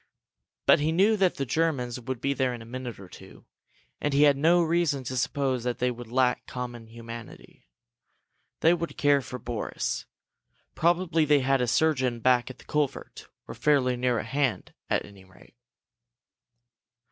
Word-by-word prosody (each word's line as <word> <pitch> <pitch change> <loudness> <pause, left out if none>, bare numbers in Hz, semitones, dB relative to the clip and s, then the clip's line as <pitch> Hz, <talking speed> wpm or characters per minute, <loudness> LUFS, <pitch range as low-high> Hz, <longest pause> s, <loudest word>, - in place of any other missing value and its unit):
But - - +6
he 150 +2 +1
knew 195 +6 +4
that 190 -3 +2
the 135 - -2
Germans 130 -4 -1
would 125 0 -5
be 140 +1 0
there 130 -2 0
in 120 - -10
a - - -13
minute 125 -2 -7
or 95 - -11
two, - - -14 0.5
and 145 -1 -1
he 145 - +5
had 145 -1 +6
no 170 +5 +4
reason 165 -5 +1
to 130 +1 -5
suppose 130 0 -1
that 120 -2 -2
they 125 0 0
would 120 -1 -9
lack 125 0 +1
common 120 -2 -6
humanity. 115 - -11 0.9
They 165 - +5
would 170 -1 -4
care 145 -1 +3
for 125 -1 -7
Boris. 120 -3 -4 0.7
Probably 170 -1 +2
they 150 -2 +4
had 135 0 +2
a 125 - +1
surgeon 130 -2 +1
back 125 +1 +2
at 130 - -10
the - - -18
culvert, 150 -3 -3 0.2
or - - -7
fairly 135 -4 +2
near 125 -1 0
at 110 - -3
hand, 135 0 -1 0.2
at - - 0
any 100 -2 -15
rate. 95 0 -20
130 Hz, 170 wpm, -27 LUFS, 120-150 Hz, 0.9 s, But